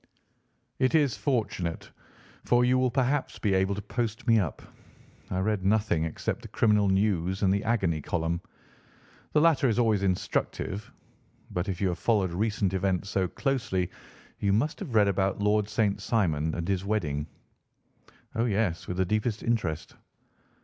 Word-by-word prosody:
"It 130 Hz, +5 st, +2 dB
is 145 Hz, -6 st, +3 dB
fortunate, 105 Hz, -, -2 dB, 0.5 s
for 120 Hz, 0 st, +3 dB
you 130 Hz, +1 st, +3 dB
will 130 Hz, 0 st, +3 dB
perhaps 135 Hz, +2 st, 0 dB
be 100 Hz, -3 st, 0 dB
able 95 Hz, +1 st, +2 dB
to 105 Hz, -, -6 dB
post 115 Hz, +1 st, -3 dB
me 115 Hz, -3 st, +5 dB
up. 90 Hz, -7 st, -3 dB, 0.7 s
I 90 Hz, -, -2 dB
read 105 Hz, -1 st, 0 dB
nothing 100 Hz, -5 st, +2 dB
except 80 Hz, -, -3 dB
the -, -, -9 dB
criminal 105 Hz, -3 st, +3 dB
news 95 Hz, -1 st, +1 dB
and 95 Hz, -1 st, +4 dB
the 100 Hz, -, 0 dB
agony 90 Hz, -9 st, +1 dB
column. 85 Hz, +3 st, -1 dB, 0.9 s
The 150 Hz, -, +4 dB
latter 155 Hz, -5 st, +4 dB
is 115 Hz, -, 0 dB
always 110 Hz, -4 st, +3 dB
instructive. 95 Hz, +1 st, -2 dB, 0.6 s
But 90 Hz, +3 st, -2 dB
if 90 Hz, -2 st, -3 dB
you 95 Hz, -, +1 dB
have 90 Hz, -, -3 dB
followed 100 Hz, -6 st, +2 dB
recent 100 Hz, -1 st, 0 dB
events 95 Hz, 0 st, -1 dB
so 95 Hz, -2 st, +1 dB
closely 120 Hz, -, -1 dB, 0.5 s
you 100 Hz, -, +1 dB
must 145 Hz, -, 0 dB
have 150 Hz, -, -5 dB
read 105 Hz, -2 st, +5 dB
about 95 Hz, 0 st, +1 dB
Lord 105 Hz, 0 st, +2 dB
St. 105 Hz, -2 st, 0 dB
Simon 80 Hz, -8 st, 0 dB
and 85 Hz, 0 st, -3 dB
his 95 Hz, -1 st, 0 dB
wedding?" 80 Hz, -8 st, -1 dB, 1.1 s
"Oh, 115 Hz, -, +1 dB
yes, 100 Hz, -6 st, 0 dB
with 90 Hz, -, -4 dB
the 95 Hz, -, +2 dB
deepest 110 Hz, +3 st, -1 dB
interest." 90 Hz, -9 st, -1 dB
100 Hz, 160 wpm, -28 LUFS, 95-115 Hz, 1.1 s, me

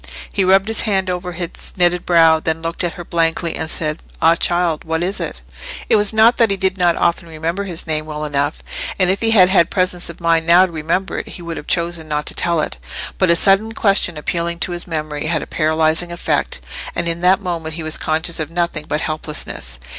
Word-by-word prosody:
He 195 Hz, -, +1 dB
rubbed 190 Hz, +2 st, +4 dB
his 225 Hz, 0 st, +4 dB
hand 195 Hz, -4 st, 0 dB
over 180 Hz, 0 st, -4 dB
his 170 Hz, -1 st, -6 dB
knitted 180 Hz, 0 st, +2 dB
brow, 165 Hz, -2 st, +5 dB
then 160 Hz, +1 st, -2 dB
looked 165 Hz, +2 st, -3 dB
at 175 Hz, -, -2 dB
her 175 Hz, -, -9 dB
blankly 165 Hz, 0 st, 0 dB
and 160 Hz, -, -3 dB
said, 155 Hz, -1 st, 0 dB, 0.2 s
"Ah, 165 Hz, -, +5 dB
child, 170 Hz, -1 st, 0 dB
what 160 Hz, +1 st, -2 dB
is 190 Hz, +3 st, -2 dB
it?" -, -, -6 dB, 0.5 s
It -, -, +5 dB
was 205 Hz, -1 st, +3 dB
not 225 Hz, +2 st, +4 dB
that 230 Hz, -2 st, +4 dB
he 195 Hz, -, 0 dB
did 190 Hz, 0 st, 0 dB
not 175 Hz, -3 st, +2 dB
often 170 Hz, 0 st, 0 dB
remember 165 Hz, +5 st, -3 dB
his 175 Hz, -4 st, -1 dB
name 155 Hz, -1 st, -2 dB
well 150 Hz, 0 st, -5 dB
enough; 145 Hz, 0 st, -1 dB, 0.4 s
and 185 Hz, -1 st, +3 dB
if 195 Hz, -, -2 dB
he 225 Hz, -, +1 dB
had 190 Hz, -5 st, +5 dB
had 170 Hz, -4 st, +4 dB
presence 180 Hz, -2 st, 0 dB
of 170 Hz, -, -10 dB
mind 165 Hz, -1 st, +1 dB
now 175 Hz, +2 st, +7 dB
to 185 Hz, -, -8 dB
remember 165 Hz, +4 st, -2 dB
it, -, -, -7 dB
he 175 Hz, -, -9 dB
would 170 Hz, -1 st, -5 dB
have -, -, -8 dB
chosen 170 Hz, -2 st, -1 dB
not 150 Hz, -1 st, -2 dB
to -, -, -2 dB
tell 170 Hz, -2 st, +1 dB
it. -, -, -4 dB, 0.4 s
But 185 Hz, -, +3 dB
a 170 Hz, -, +5 dB
sudden 200 Hz, +5 st, +4 dB
question 195 Hz, -6 st, +2 dB
appealing 170 Hz, +3 st, -2 dB
to -, -, 0 dB
his 175 Hz, +1 st, -2 dB
memory, 155 Hz, -2 st, -3 dB
had 160 Hz, -1 st, -1 dB
a -, -, -7 dB
paralysing 160 Hz, +2 st, +1 dB
effect, 175 Hz, -, -2 dB, 0.3 s
and 170 Hz, -, -1 dB
in 170 Hz, 0 st, -1 dB
that 180 Hz, +2 st, +3 dB
moment 165 Hz, -5 st, -4 dB
he 165 Hz, -, -5 dB
was 155 Hz, 0 st, -3 dB
conscious 160 Hz, +2 st, -1 dB
of 155 Hz, -1 st, -3 dB
nothing 170 Hz, -2 st, -2 dB
but 150 Hz, -, -1 dB
helplessness. 150 Hz, -, -2 dB
170 Hz, 230 wpm, -18 LUFS, 160-185 Hz, 0.5 s, now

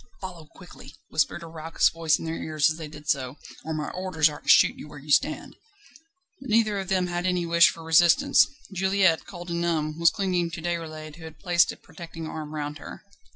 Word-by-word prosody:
"Follow 175 Hz, -5 st, -9 dB
quietly!" 180 Hz, -, -14 dB
whispered 155 Hz, +2 st, 0 dB
a -, -, -8 dB
raucous 160 Hz, 0 st, 0 dB
voice 165 Hz, -2 st, +1 dB
in -, -, -8 dB
their 160 Hz, -, -3 dB
ears 155 Hz, -2 st, 0 dB
as 155 Hz, -, -6 dB
they 160 Hz, -2 st, -7 dB
did 150 Hz, -1 st, -13 dB
so, 130 Hz, 0 st, -1 dB, 0.3 s
"or 160 Hz, -, -5 dB
my 155 Hz, -1 st, -3 dB
orders 180 Hz, -5 st, +1 dB
are 150 Hz, -, -9 dB
to -, -, -7 dB
shoot -, -, +6 dB
you -, -, -10 dB
where 150 Hz, 0 st, -12 dB
you 145 Hz, +1 st, -9 dB
stand." 145 Hz, -, +1 dB, 0.8 s
But 265 Hz, -1 st, -10 dB
neither 215 Hz, -2 st, +2 dB
of 190 Hz, -, -5 dB
them 185 Hz, -1 st, +1 dB
had 175 Hz, 0 st, -2 dB
any 180 Hz, -1 st, 0 dB
wish 170 Hz, 0 st, +5 dB
for 165 Hz, -, -9 dB
resistance. 170 Hz, -, +5 dB, 0.3 s
Juliette, 190 Hz, -2 st, +2 dB
cold 175 Hz, -2 st, -8 dB
and 170 Hz, 0 st, -2 dB
numb, 155 Hz, -2 st, -1 dB
was 170 Hz, -1 st, +6 dB
clinging 180 Hz, -4 st, -1 dB
to 165 Hz, 0 st, -7 dB
Déroulède, 155 Hz, -3 st, -5 dB
who 170 Hz, -, -13 dB
had 160 Hz, -1 st, -11 dB
placed 175 Hz, -2 st, +2 dB
a -, -, -11 dB
protecting 165 Hz, -1 st, -10 dB
arm 155 Hz, -1 st, -7 dB
round 150 Hz, 0 st, -5 dB
her. -, -, -10 dB
165 Hz, 215 wpm, -25 LUFS, 155-180 Hz, 0.8 s, shoot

